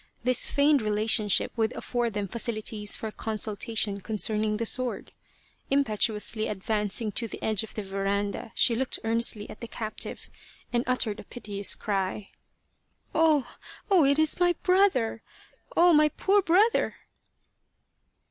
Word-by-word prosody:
This 250 +1 +3
feigned 285 -1 +3
relationship 215 -1 +2
would 225 0 0
afford 240 -2 -2
them 205 -1 -2
facilities 215 -1 -3
for 220 - -5
consultation 215 -1 -2
concerning 215 0 0
the 230 - -2
sword. 255 +2 -1 0.6
Impetuously 220 -4 +1
advancing 210 +2 -2
to 230 +3 -2
the - - -8
edge 215 -3 +1
of 220 - -9
the 215 - -4
veranda, 200 +2 -3
she 235 - +4
looked 250 +2 0
earnestly 225 -2 +1
at - - -12
the 235 - -6
captive 220 -1 -6 0.5
and 240 0 +1
uttered 240 -4 0
a - - -8
piteous 205 -3 -1
cry: 195 0 -3 0.4
" - - -47
Oh, 315 -4 +3 0.4
oh! 365 -5 +6
it 280 +1 +3
is 315 +1 +3
my 350 0 +4
brother! 365 - +2 0.6
Oh! 345 0 +6
my 300 0 +5
poor 400 +6 +2
brother 390 +6 +2
225 Hz, 140 wpm, -27 LUFS, 210-265 Hz, 0.6 s, oh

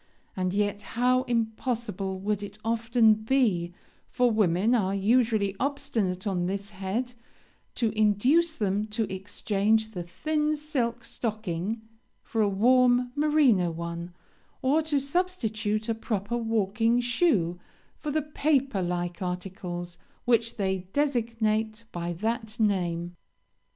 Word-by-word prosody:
and 185 -1 0
yet 205 +1 0 0.2
how 250 +1 +4
impossible 225 -4 -2
would 205 +1 -1
it 205 0 -7
often 230 0 +4
be 215 -6 +1 0.4
for 245 -1 +2
women 210 +1 +2
are 200 -5 +2
usually 215 -1 +2
obstinate 250 -10 -1
on 180 -3 0
this 200 +2 -3
head 205 +6 -3 0.6
to 230 -3 +1
induce 245 +11 +3
them 205 -2 0
to 220 +1 -1
exchange 210 +3 0
the 180 -5 -5
thin 300 - -1
silk 280 -6 -2
stocking 215 -1 -3 0.4
for 225 - -1
a 205 - +3
warm 245 +4 +4
merino 290 - +4
one, 170 +1 -5 0.5
or 285 +5 +3
to 300 -2 0
substitute 230 - -1
a 230 - +1
proper 220 -1 -3
walking 225 0 +1
shoe 230 - +1 0.4
for 300 - -4
the 305 +1 0
paper 275 -7 +1
like 175 +1 -2
articles 180 -1 -5 0.3
which 230 -1 +2
they 190 -2 0
designate 230 -5 0
by 175 0 -3
that 220 +5 -3
name! 175 -5 0
220 Hz, 120 wpm, -27 LUFS, 190-245 Hz, 0.6 s, how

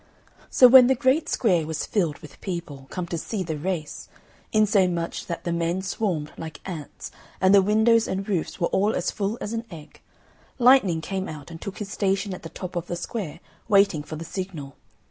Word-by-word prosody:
So 255 - +7
when 250 0 +9
the 265 - +3
great 260 +5 +2
square 180 -10 +2
was 160 -1 -3
filled 170 -8 0
with 150 - -13
people, 165 -8 -6
come 180 -2 -4
to 170 -1 -4
see 200 +3 -3
the 160 -3 -3
race, 155 -1 -4 0.4
insomuch 190 -6 +1
that 170 - -5
the 170 - -2
men 170 +2 -1
swarmed 185 -6 -2
like 160 -1 -7
ants, 165 -6 -7 0.3
and 190 +1 +4
the 200 - +8
windows 220 +3 +3
and 195 +1 -3
roofs 185 -6 -2
were 170 - +2
all 205 +3 +2
as - - -1
full 205 +3 -2
as 210 - -4
an 230 0 -2
egg, 155 -3 -12 0.6
Lightning 240 -10 +5
came 190 +3 -4
out 155 0 -9
and 165 - -9
took 200 - -6
his 200 -2 -6
station 195 0 0
at 185 - -8
the 165 - -8
top 185 +1 -7
of 175 0 -3
the 175 - -3
square, 175 -1 -5 0.3
waiting 195 -7 +4
for 155 +2 -8
the 165 +2 -7
signal. 165 -8 -6
185 Hz, 200 wpm, -25 LUFS, 165-205 Hz, 0.6 s, when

